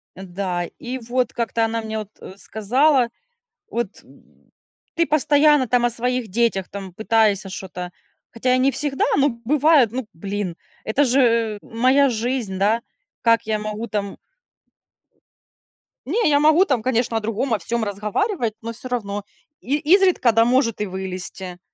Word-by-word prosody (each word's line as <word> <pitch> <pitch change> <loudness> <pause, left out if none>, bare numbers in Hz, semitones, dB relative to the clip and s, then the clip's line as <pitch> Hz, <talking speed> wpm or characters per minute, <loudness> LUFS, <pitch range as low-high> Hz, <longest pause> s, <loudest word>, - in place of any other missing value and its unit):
Да, 180 -1 -3
и 255 -2 -5
вот 245 0 -2
как-то 230 -1 0
она 225 0 -2
мне 220 0 -4
вот, 210 -1 -7
э, - - -9
сказала, 250 +5 +2 0.6
вот, 235 -4 -4
м: - - -23 0.4
"Ты 335 0 +2
постоянно 295 -2 +4
там 245 -1 +2
о 240 - +3
своих 245 0 -1
детях 205 -2 0
там 195 -2 -8
пытаешься 215 -2 +2
что-то",- 180 -1 -7 0.4
хотя 250 +2 0
и - - +3
не 265 +2 +3
всегда, 280 -1 -1
но 285 +1 +4
бывает, 265 +2 +3
ну, 255 -3 -4
блин, 195 0 -4 0.3
это 270 +7 +2
же 230 -4 +2
моя 260 +5 +3
жизнь, 230 -4 -2
да. 215 +4 +2 0.4
Как 230 -2 +4
я 215 -1 -1
могу 215 +2 -4
там 200 -1 -3 1.9
Не, 370 - +1
я 285 - +4
могу 310 +5 +5
там, 260 - 0
конечно 235 -1 0
о - - +1
другом 225 +3 -2
о 210 - +1
всём 230 +7 -2
разговаривать, 215 - -1
но 230 0 -5
всё 240 - -9
равно, 205 -4 -3 0.4
и 280 +4 0
изредка, 340 - +4
да 225 +1 +4
может 240 -4 +1
и - - 0
вылезти. 185 -1 -6
230 Hz, 155 wpm, -21 LUFS, 205-260 Hz, 1.9 s, могу